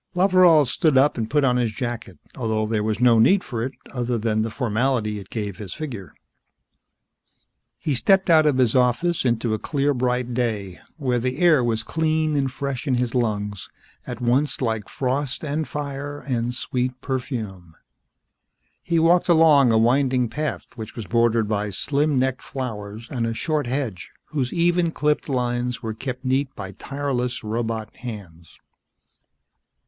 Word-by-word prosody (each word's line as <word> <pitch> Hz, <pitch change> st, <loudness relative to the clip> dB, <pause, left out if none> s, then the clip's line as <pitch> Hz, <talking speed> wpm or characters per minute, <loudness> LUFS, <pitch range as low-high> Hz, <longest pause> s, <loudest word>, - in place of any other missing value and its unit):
Loveral 180 Hz, -5 st, +5 dB
stood 145 Hz, +3 st, +2 dB
up 140 Hz, +3 st, +4 dB
and 115 Hz, -2 st, -3 dB
put 150 Hz, -1 st, +2 dB
on 125 Hz, -2 st, +3 dB
his 120 Hz, -3 st, +1 dB
jacket, 120 Hz, -5 st, -5 dB, 0.2 s
although 110 Hz, -3 st, -1 dB
there 110 Hz, -1 st, 0 dB
was 110 Hz, 0 st, -1 dB
no 120 Hz, -2 st, +5 dB
need 185 Hz, -, +5 dB
for 115 Hz, -3 st, -4 dB
it, 130 Hz, +2 st, -3 dB, 0.2 s
other 125 Hz, -2 st, -1 dB
than 110 Hz, -1 st, 0 dB
the 110 Hz, -, -1 dB
formality 115 Hz, -2 st, 0 dB
it 95 Hz, -, -12 dB
gave 105 Hz, -4 st, -4 dB
his 100 Hz, -4 st, -7 dB
figure. 120 Hz, -, -7 dB, 1.6 s
He 150 Hz, -, -2 dB
stepped 190 Hz, +10 st, +3 dB
out 160 Hz, -3 st, +5 dB
of 145 Hz, -3 st, +2 dB
his 125 Hz, -4 st, +3 dB
office 130 Hz, +8 st, +2 dB
into 115 Hz, -2 st, +1 dB
a 110 Hz, -, -1 dB
clear 145 Hz, +1 st, 0 dB
bright 125 Hz, -1 st, -1 dB
day, 110 Hz, -7 st, -2 dB, 0.2 s
where 125 Hz, -5 st, 0 dB
the 130 Hz, +2 st, -2 dB
air 160 Hz, -7 st, +4 dB
was 115 Hz, -2 st, 0 dB
clean 155 Hz, +2 st, 0 dB
and 135 Hz, -2 st, 0 dB
fresh 140 Hz, +1 st, -4 dB
in 130 Hz, -, +2 dB
his 120 Hz, -1 st, -1 dB
lungs, 105 Hz, -5 st, -2 dB, 0.4 s
at 120 Hz, -2 st, -5 dB
once 125 Hz, +2 st, +1 dB
like 110 Hz, -5 st, -2 dB
frost 135 Hz, +1 st, -2 dB
and 150 Hz, +1 st, -2 dB
fire 145 Hz, 0 st, -5 dB
and 125 Hz, -2 st, -2 dB
sweet 125 Hz, 0 st, -2 dB
perfume. 110 Hz, -, -5 dB, 1.1 s
He 170 Hz, -, 0 dB
walked 170 Hz, +2 st, +4 dB
along 155 Hz, -6 st, +6 dB
a 110 Hz, -, +4 dB
winding 125 Hz, +1 st, +2 dB
path, 155 Hz, +3 st, -3 dB
which 110 Hz, -2 st, -8 dB
was 115 Hz, -, -6 dB
bordered 115 Hz, +2 st, +2 dB
by 105 Hz, -1 st, -1 dB
slim 145 Hz, +8 st, 0 dB
necked 130 Hz, 0 st, 0 dB
flowers 110 Hz, -4 st, -6 dB
and 120 Hz, -3 st, -1 dB
a 115 Hz, -, -3 dB
short 150 Hz, 0 st, -1 dB
hedge 120 Hz, -9 st, -3 dB, 0.2 s
whose 135 Hz, -5 st, -2 dB
even 170 Hz, 0 st, +2 dB
clipped 150 Hz, -1 st, 0 dB
lines 125 Hz, -1 st, -1 dB
were 110 Hz, -1 st, -3 dB
kept 130 Hz, +3 st, -6 dB
neat 135 Hz, +1 st, 0 dB
by 95 Hz, -1 st, -6 dB
tireless 125 Hz, +1 st, -3 dB
robot 110 Hz, 0 st, -3 dB
hands. 95 Hz, -9 st, -9 dB
125 Hz, 165 wpm, -23 LUFS, 110-140 Hz, 1.6 s, along